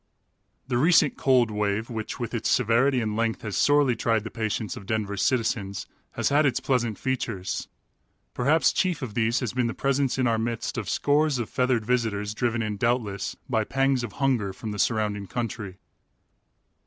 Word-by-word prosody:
The 120 -2 0
recent 155 0 +4
"cold 125 -4 +3
wave," 105 +1 -1
which 110 +3 -5
with 120 -1 -4
its 115 - -1
severity 125 +2 +3
and 110 -2 -2
length 115 +2 -1
has 105 -3 -4
sorely 145 -4 +4
tried 115 -1 +1
the 110 - -7
patience 110 -2 -2
of 100 - -10
Denver's 105 -3 -1
citizens, 110 -5 0 0.3
has - - 0
had 145 +2 +4
its 140 -4 +2
pleasant 120 -5 0
features. 115 -8 -3 0.7
Perhaps 145 +6 +3
chief 180 -6 0
of 115 -5 -5
these 115 +3 +1
has 125 - -2
been 125 -1 +1
the 115 - -4
presence 135 -1 0
in 130 - +1
our 115 -2 +2
midst 115 0 -3
of 105 -5 -4
scores 145 -1 +2
of 120 -3 -4
feathered 125 -3 +1
visitors 110 -4 0
driven 120 0 0
in, 105 -1 -3
doubtless, 105 -4 -1
by 110 -4 +1
pangs 135 +1 +1
of 115 - -5
hunger, 125 -8 0
from 110 +3 -6
the 105 - -5
surrounding 105 -1 0
country. 110 -4 -4
115 Hz, 180 wpm, -26 LUFS, 105-130 Hz, 0.7 s, recent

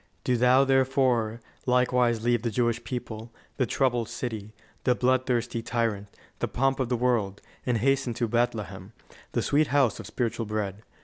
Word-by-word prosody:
"Do 125 - +2
thou, 125 +3 +5
therefore, 130 -4 +2 0.3
likewise 125 -2 +2
leave 120 -1 +2
the 120 - -1
Jewish 120 +1 0
people, 115 -2 -6 0.3
the 130 - +1
troubled 125 -4 +1
city, 110 -3 -5 0.3
the 125 - +3
bloodthirsty 125 -2 +1
tyrant, 115 -4 -1 0.3
the - - 0
pomp 135 +1 0
of 130 -3 0
the 125 - +1
world, 115 -5 0 0.3
and 125 -2 +2
hasten 135 0 +1
to 120 - 0
Bethlehem, 110 -4 -2 0.4
the - - +1
sweet 150 +1 +3
house 135 -5 +2
of - - -7
spiritual 115 -2 -2
bread. 105 -2 -3
120 Hz, 160 wpm, -27 LUFS, 115-125 Hz, 0.4 s, thou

